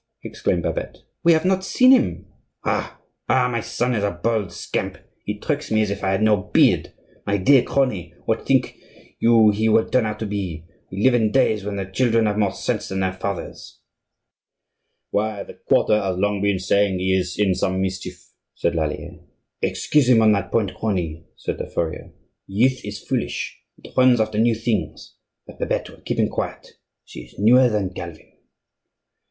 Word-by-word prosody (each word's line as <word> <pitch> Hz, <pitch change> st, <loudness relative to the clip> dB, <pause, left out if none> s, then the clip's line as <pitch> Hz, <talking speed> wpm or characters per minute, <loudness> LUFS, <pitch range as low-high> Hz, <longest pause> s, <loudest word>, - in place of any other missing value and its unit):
exclaimed -, -, -2 dB
Babette. -, -, -4 dB, 0.2 s
"We 170 Hz, -1 st, +6 dB
have 160 Hz, +2 st, +1 dB
not 190 Hz, 0 st, +2 dB
seen 255 Hz, +6 st, +4 dB
him." 260 Hz, -1 st, +2 dB, 0.4 s
"Ha! -, -, -2 dB, 0.3 s
ha! 130 Hz, -1 st, +3 dB
my 115 Hz, -2 st, -2 dB
son 120 Hz, +2 st, -1 dB
is 105 Hz, -4 st, -1 dB
a 100 Hz, -, +2 dB
bold 105 Hz, +2 st, -2 dB
scamp! -, -, -4 dB, 0.3 s
He 105 Hz, 0 st, -3 dB
tricks 150 Hz, +6 st, -3 dB
me 110 Hz, 0 st, +2 dB
as 105 Hz, -, -2 dB
if 100 Hz, 0 st, -5 dB
I 95 Hz, -, +1 dB
had 95 Hz, +2 st, +1 dB
no 110 Hz, -1 st, +4 dB
beard. 95 Hz, -, +2 dB, 0.4 s
My 100 Hz, 0 st, +1 dB
dear 130 Hz, +7 st, +5 dB
crony, 100 Hz, -12 st, -1 dB
what 110 Hz, -, -1 dB
think 135 Hz, -2 st, +1 dB, 0.4 s
you 115 Hz, -2 st, +5 dB
he 110 Hz, +2 st, +1 dB
will 110 Hz, +1 st, +3 dB
turn 125 Hz, -4 st, +1 dB
out 105 Hz, -, -4 dB
to 110 Hz, -, -4 dB
be? 95 Hz, -6 st, -4 dB, 0.3 s
We 95 Hz, +3 st, -3 dB
live 130 Hz, -, +5 dB
in 110 Hz, -3 st, +2 dB
days 110 Hz, -6 st, +2 dB
when 100 Hz, 0 st, -4 dB
the 100 Hz, -1 st, -3 dB
children 115 Hz, +3 st, +1 dB
have 105 Hz, 0 st, 0 dB
more 100 Hz, -3 st, +2 dB
sense -, -, -3 dB
than 95 Hz, 0 st, -3 dB
their 95 Hz, -1 st, 0 dB
fathers." 95 Hz, -1 st, -6 dB, 1.3 s
"Why, 105 Hz, -1 st, -1 dB
the -, -, -12 dB, 0.2 s
quarter 105 Hz, 0 st, +3 dB
has 95 Hz, -2 st, -2 dB
long 100 Hz, +1 st, 0 dB
been 100 Hz, -1 st, +1 dB
saying 95 Hz, +1 st, +1 dB
he 95 Hz, +1 st, +1 dB
is 90 Hz, -2 st, -2 dB
in 100 Hz, -3 st, +2 dB
some 95 Hz, 0 st, -1 dB
mischief," 95 Hz, 0 st, -4 dB, 0.3 s
said -, -, 0 dB
Lallier. -, -, -3 dB, 0.4 s
"Excuse 145 Hz, -4 st, +1 dB
him 115 Hz, -3 st, +6 dB
on 110 Hz, -, +6 dB
that 100 Hz, -2 st, -1 dB
point, 105 Hz, -5 st, 0 dB
crony," 85 Hz, -7 st, -3 dB
said -, -, -4 dB
the -, -, -4 dB
furrier. 80 Hz, -2 st, -4 dB, 0.4 s
"Youth 125 Hz, +7 st, +1 dB
is 105 Hz, 0 st, -6 dB
foolish; -, -, -3 dB, 0.2 s
it -, -, -14 dB
runs 130 Hz, -2 st, +5 dB
after 110 Hz, -1 st, 0 dB
new 115 Hz, 0 st, +3 dB
things; 115 Hz, 0 st, -3 dB, 0.3 s
but -, -, -14 dB
Babette -, -, -2 dB
will -, -, -17 dB
keep -, -, -3 dB
him -, -, +3 dB
quiet; -, -, -5 dB, 0.3 s
she -, -, -10 dB
is -, -, -13 dB
newer 125 Hz, +5 st, +5 dB
than 100 Hz, -4 st, -2 dB
Calvin." 85 Hz, -3 st, -9 dB
105 Hz, 185 wpm, -22 LUFS, 95-115 Hz, 1.3 s, We